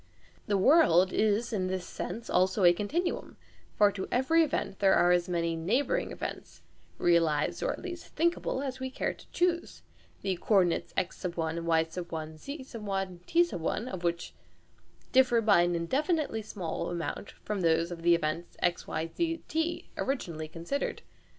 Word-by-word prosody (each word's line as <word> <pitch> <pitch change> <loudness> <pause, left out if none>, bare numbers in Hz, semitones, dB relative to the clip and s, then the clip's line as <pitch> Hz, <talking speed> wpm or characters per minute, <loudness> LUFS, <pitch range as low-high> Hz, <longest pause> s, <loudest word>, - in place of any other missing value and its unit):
The" 205 - +2
world" 190 - +5
is 220 +2 +1
in 185 -3 0
this 185 -1 -3
sense 230 - -6
also 185 +2 +2
a 175 -1 +8
continuum; 315 - -2 0.4
for 205 -1 +5
to 195 -1 -5
every 265 +7 +3
event 285 -10 -1
there 195 -1 +5
are 175 0 +4
as 175 0 +2
many 170 -1 0
"neighbouring" 240 - 0
events - - -7 0.3
(realised 165 -4 +2
or - - +1
at - - -7
least 350 -2 -6
thinkable) 330 -4 0
as 265 -2 -4
we 260 0 -3
care 260 - -2
to - - -18
choose, 345 -1 -1 0.4
the 190 -2 0
co 210 - +1
ordinates 175 -1 -1
x, 180 - -2
y, 170 -3 -2 0.8
z, 275 - -8 0.6
t 345 +1 +4
of 185 +3 -3
which 170 0 -2 0.8
differ 255 -2 +5
by 210 -6 +5
an 175 0 +1
indefinitely 275 - 0
small 190 -6 -4
amount 175 +3 -4
from 210 -2 -5
those 165 0 +2
of 170 -1 -6
the 170 0 +5
event 170 +1 -2
x, 175 0 0
y, 160 +1 -2
z, 330 -1 -1
t 325 +2 -2
originally 170 - -2
considered. 170 - -3
195 Hz, 155 wpm, -30 LUFS, 170-270 Hz, 0.8 s, a